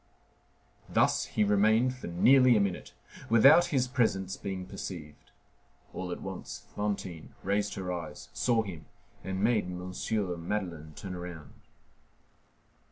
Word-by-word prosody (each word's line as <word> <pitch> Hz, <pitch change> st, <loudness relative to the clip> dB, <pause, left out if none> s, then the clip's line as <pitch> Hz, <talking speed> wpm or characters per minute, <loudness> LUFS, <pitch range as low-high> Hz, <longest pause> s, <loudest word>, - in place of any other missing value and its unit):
Thus -, -, +2 dB
he 105 Hz, -, 0 dB
remained 110 Hz, +5 st, +3 dB
for 130 Hz, -, -8 dB
nearly 125 Hz, +8 st, +5 dB
a -, -, +3 dB
minute, 100 Hz, -3 st, -2 dB, 0.3 s
without 135 Hz, +10 st, +7 dB
his 130 Hz, -3 st, +1 dB
presence 95 Hz, -7 st, 0 dB
being 95 Hz, -2 st, -5 dB
perceived. 75 Hz, -4 st, -8 dB, 0.6 s
All -, -, -4 dB
at -, -, -5 dB
once -, -, -7 dB
Fantine 100 Hz, -6 st, -4 dB
raised 100 Hz, +2 st, 0 dB
her 90 Hz, -2 st, -3 dB
eyes, 80 Hz, -4 st, -7 dB
saw 115 Hz, -2 st, +2 dB
him, 85 Hz, -6 st, -8 dB, 0.4 s
and 95 Hz, +1 st, -3 dB
made 110 Hz, -3 st, +3 dB
M. 90 Hz, 0 st, -6 dB, 0.6 s
Madeleine 85 Hz, -7 st, -3 dB
turn 95 Hz, -2 st, -6 dB
round. 90 Hz, -3 st, -8 dB
100 Hz, 125 wpm, -30 LUFS, 90-115 Hz, 0.6 s, without